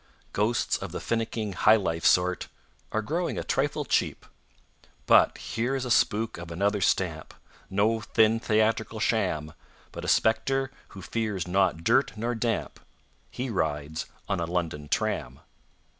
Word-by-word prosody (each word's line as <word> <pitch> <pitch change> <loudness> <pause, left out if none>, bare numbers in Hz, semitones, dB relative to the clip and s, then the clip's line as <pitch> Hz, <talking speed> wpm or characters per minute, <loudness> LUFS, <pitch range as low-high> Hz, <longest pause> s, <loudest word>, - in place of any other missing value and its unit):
Ghosts 110 +3 +1
of - - -7
the - - -4
finicking, 115 -2 -2
"high 105 +4 +5
life" 85 -6 -2
sort 90 0 +3 0.4
Are 110 - -1
growing 170 +8 -2
a - - -2
trifle 145 +2 -1
cheap. - - 0 0.8
But - - +5
here 120 +6 -2
is 130 -1 -2
a 125 - -3
spook 110 -5 +2
of 85 0 -8
another 100 +4 0
stamp, 85 -4 0 0.3
No 105 +4 +2
thin, 110 +1 +3
theatrical 110 0 +1
sham, 75 0 0 0.4
But - - -7
a - - -4
spectre 135 +4 +2 0.3
who 95 - -8
fears 105 -6 -2
not 90 -3 +1
dirt 135 +3 +2
nor 120 +3 -1
damp: 115 0 -2 0.5
He 125 0 -4
rides 80 -4 -2 0.2
on 95 -3 -1
a 85 - -1
London 80 -4 -3
tram. 65 -1 -1
105 Hz, 145 wpm, -27 LUFS, 90-115 Hz, 0.8 s, high